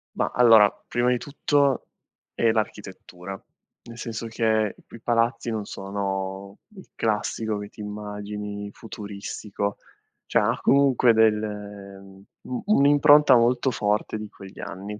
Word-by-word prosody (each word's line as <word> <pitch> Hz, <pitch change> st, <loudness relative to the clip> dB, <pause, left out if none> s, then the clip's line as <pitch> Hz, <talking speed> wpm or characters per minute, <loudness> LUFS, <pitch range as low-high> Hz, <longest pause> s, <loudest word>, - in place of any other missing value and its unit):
Ma, -, -, 0 dB
allora 115 Hz, -4 st, +7 dB, 0.2 s
prima 120 Hz, +1 st, +1 dB
di 125 Hz, -, +2 dB
tutto 140 Hz, 0 st, 0 dB, 0.5 s
è 115 Hz, -, +2 dB
l'architettura, 95 Hz, -3 st, -5 dB, 0.4 s
nel 115 Hz, 0 st, -12 dB
senso 115 Hz, -1 st, -5 dB
che 110 Hz, -2 st, 0 dB
i -, -, -19 dB
piu -, -, -12 dB
i -, -, -21 dB
palazzi 115 Hz, 0 st, 0 dB
non 110 Hz, -2 st, -2 dB
sono 95 Hz, 0 st, -5 dB, 0.2 s
il 190 Hz, -, -13 dB
classico 110 Hz, 0 st, -1 dB
che 105 Hz, -, -7 dB
ti -, -, -21 dB
immagini, 105 Hz, 0 st, -6 dB
futuristico. 100 Hz, -1 st, -6 dB, 0.5 s
Cioè, -, -, +2 dB
ha -, -, 0 dB
comunque 135 Hz, -4 st, +4 dB
delle 105 Hz, -3 st, -1 dB
mhmm, 95 Hz, 0 st, -16 dB, 0.2 s
un 125 Hz, -, -5 dB
un'impronta 145 Hz, -5 st, +6 dB
molto 120 Hz, +2 st, +3 dB
forte 105 Hz, 0 st, -1 dB
di 105 Hz, 0 st, -6 dB
quegli 95 Hz, -1 st, -13 dB
anni. 100 Hz, +2 st, -7 dB
105 Hz, 135 wpm, -24 LUFS, 100-120 Hz, 0.5 s, allora